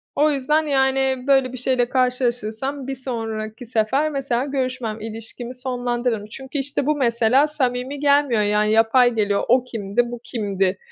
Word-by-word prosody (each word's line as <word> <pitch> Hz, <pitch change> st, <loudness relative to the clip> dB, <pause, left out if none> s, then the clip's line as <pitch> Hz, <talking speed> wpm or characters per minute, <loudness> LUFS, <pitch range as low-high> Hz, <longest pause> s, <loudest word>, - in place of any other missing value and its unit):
O 300 Hz, +1 st, +3 dB
yüzden, 295 Hz, +3 st, +1 dB
yani, 265 Hz, -2 st, +1 dB
böyle 270 Hz, -2 st, +3 dB
bir -, -, -5 dB
şeyle 250 Hz, -1 st, 0 dB
karşılaşırsam 250 Hz, +1 st, -1 dB
bir 270 Hz, -, -3 dB
sonraki 225 Hz, -3 st, -5 dB
sefer, 240 Hz, +6 st, +1 dB
mesela, 265 Hz, -3 st, -1 dB
görüşmem, 255 Hz, -5 st, -3 dB
ilişkimi 225 Hz, +3 st, -7 dB
sonlandırırım. 245 Hz, -3 st, -2 dB
Çünkü, 265 Hz, +3 st, -6 dB
işte, 275 Hz, 0 st, -2 dB
bu 300 Hz, +1 st, +2 dB
mesela 245 Hz, +1 st, +3 dB
samimi 265 Hz, -2 st, -2 dB
gelmiyor, 285 Hz, -5 st, +3 dB
yani, 210 Hz, +1 st, +2 dB
yapay 230 Hz, +3 st, +4 dB
geliyor, 205 Hz, -2 st, +1 dB
"O 250 Hz, +1 st, +4 dB
kimdi, 235 Hz, 0 st, -2 dB
bu 240 Hz, -, -6 dB
kimdi?" 195 Hz, -5 st, -1 dB
250 Hz, 150 wpm, -22 LUFS, 225-270 Hz, -, yapay